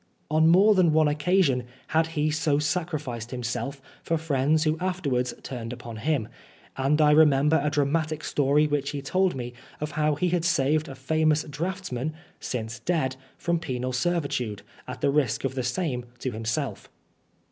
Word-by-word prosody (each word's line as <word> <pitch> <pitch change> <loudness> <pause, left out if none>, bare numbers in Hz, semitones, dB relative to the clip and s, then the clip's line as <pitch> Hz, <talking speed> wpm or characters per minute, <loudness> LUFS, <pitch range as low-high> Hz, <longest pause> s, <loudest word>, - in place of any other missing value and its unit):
On 160 +1 +4
more 195 +5 +6
than 180 -5 +4
one 155 -1 +4
occasion 150 -4 +2 0.2
had 160 +1 +2
he 150 +1 +2
so 150 -1 +1
sacrificed 150 -7 -2
himself 125 +2 -4 0.2
for 165 - 0
friends 155 0 +1
who 155 -1 +2
afterwards, 145 -10 -1
turned 120 -3 -5
upon 120 -2 -8
him; 140 -2 0 0.5
and 140 +3 +1
I 150 -1 +6
remember 150 0 +5
a 150 - +2
dramatic 155 +2 0
story 145 +1 +2
which 145 -2 -1
he 145 -2 -4
told 185 +4 +1
me 125 -1 -5 0.3
of 150 +1 -3
how 150 -1 +1
he 180 +5 0
had 175 -1 0
saved 155 -2 +2
a 135 - -8
famous 155 +3 +1
draughtsman 155 -2 -4 0.3
(since 115 -1 -4
dead) 145 -7 0 0.2
from 170 -1 0
penal 130 -5 -3
servitude, 125 - -1 0.2
at - - -7
the 140 - +3
risk 135 -6 +1
of 135 -1 -1
the 130 - -2
same 125 0 -2
to 130 +1 -3
himself. 115 +1 -3
150 Hz, 165 wpm, -26 LUFS, 130-160 Hz, 0.5 s, more